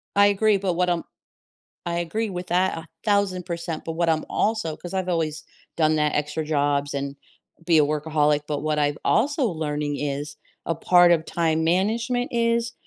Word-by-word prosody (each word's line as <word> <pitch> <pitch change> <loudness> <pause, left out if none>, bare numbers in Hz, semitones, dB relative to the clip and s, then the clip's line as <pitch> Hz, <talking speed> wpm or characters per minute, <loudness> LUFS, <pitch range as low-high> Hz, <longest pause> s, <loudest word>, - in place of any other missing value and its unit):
I 200 0 +6
agree, 205 +1 +3
but 190 -2 -1
what 180 +1 +1
I'm 175 -1 0 0.8
I 170 0 -2
agree 190 +6 -2
with 180 -1 -5
that 180 0 +1
1000%, 170 -1 -2
but 165 - -3
what 170 +1 0
I'm 160 -1 +1
also 215 -7 0
'cause 175 - -9
I've 185 -1 -1
always 160 -3 -1 0.3
done 155 -1 +3
that, 150 -1 +1
extra 150 +1 -2
jobs 145 -1 0
and 140 0 -3 0.5
be 170 -2 +4
a - - +7
workaholic, 150 0 +1
but 150 -2 -2
what 155 0 -1
I've 145 0 +1
also 290 -1 +2
learning 150 -4 -2
is 145 +1 -4 0.3
a 165 - -1
part 175 +2 +5
of 165 -2 +2
time 160 -1 0
management 225 +8 +1
is 235 0 +1
165 Hz, 175 wpm, -24 LUFS, 150-190 Hz, 0.8 s, a